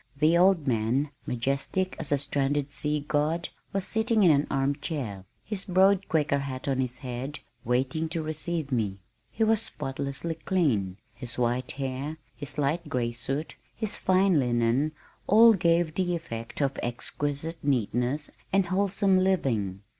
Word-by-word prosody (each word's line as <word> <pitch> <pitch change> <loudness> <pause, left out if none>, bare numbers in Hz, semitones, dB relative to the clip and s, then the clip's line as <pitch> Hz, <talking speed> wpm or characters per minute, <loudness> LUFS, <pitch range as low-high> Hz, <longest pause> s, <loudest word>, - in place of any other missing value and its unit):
The 155 +4 +4
old 180 -3 +4
man, 125 +4 +1 0.2
majestic 140 +9 -1
as 150 -3 -3
a 145 - +4
stranded 140 +1 0
sea 150 +1 -1
God, 155 +3 0 0.2
was 195 -1 -1
sitting 220 -1 +2
in 175 - +7
an 145 0 +2
arm 135 +1 +1
chair, 125 - -4 0.2
his 210 -3 -2
broad 195 +1 +3
Quaker 150 -3 +2
hat 135 0 -5
on 135 -1 +1
his 125 -1 -2
head, 125 +4 -4 0.3
waiting 130 +7 0
to 165 -1 -2
receive 155 -1 -3
me. 105 -6 0 0.3
He 225 - -1
was 220 0 +3
spotlessly 140 -1 -3
clean. 140 - 0 0.2
His 125 -2 -6
white 125 +1 0
hair, 135 +3 -4 0.2
his 145 -1 -5
light 150 +3 0
gray 120 -2 0
suit, 135 +6 -4 0.2
his 215 -2 -1
fine 185 -3 +3
linen 120 +4 +1 0.3
all 225 +3 +8
gave 170 -3 +2
the 180 0 0
effect 115 -6 -6
of 140 0 -1
exquisite 145 +6 -3
neatness 130 +2 0 0.2
and 195 -1 +3
wholesome 195 +1 +2
living. 120 - 0
145 Hz, 150 wpm, -27 LUFS, 130-175 Hz, 0.3 s, all